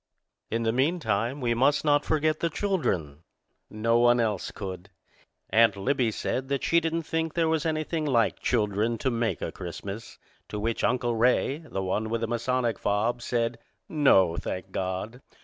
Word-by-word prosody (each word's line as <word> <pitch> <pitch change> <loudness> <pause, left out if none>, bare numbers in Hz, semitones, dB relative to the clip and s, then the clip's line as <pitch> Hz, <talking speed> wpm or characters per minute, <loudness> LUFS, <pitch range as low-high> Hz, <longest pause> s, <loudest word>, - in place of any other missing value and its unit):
In 115 +1 -1
the 110 - +2
meantime, 130 - 0
we 120 -1 +1
must 140 +6 +2
not 145 -1 +4
forget 155 0 +1
the 170 - 0
children. 95 - -1 0.5
No 115 +2 +1
one 120 0 +5
else 105 -5 0
could. 95 -1 -7 0.6
Aunt 115 -2 +5
Libbie 125 +3 +1
said 130 +4 -2
that 140 -1 -1
she 170 - +4
didn't 165 0 -2
think 160 0 -2
there 165 -1 +2
was 160 0 +1
anything 155 0 -1
like 120 -6 +2
children 110 0 0
to 130 - -1
make 115 -1 -1
a - - -3
Christmas; 100 +4 -7 0.3
to 105 - -4
which 115 +2 -2
Uncle 120 -1 +1
Ray, 125 +5 +2
the 155 -12 -5
one 105 +4 -1
with 115 0 -1
the 115 - 0
Masonic 120 0 -1
fob, 110 +4 0
said, 115 -1 -1 0.3
"No, 95 - +4
thank 95 +1 -5
God!" 95 +7 -4
120 Hz, 165 wpm, -27 LUFS, 105-145 Hz, 0.6 s, one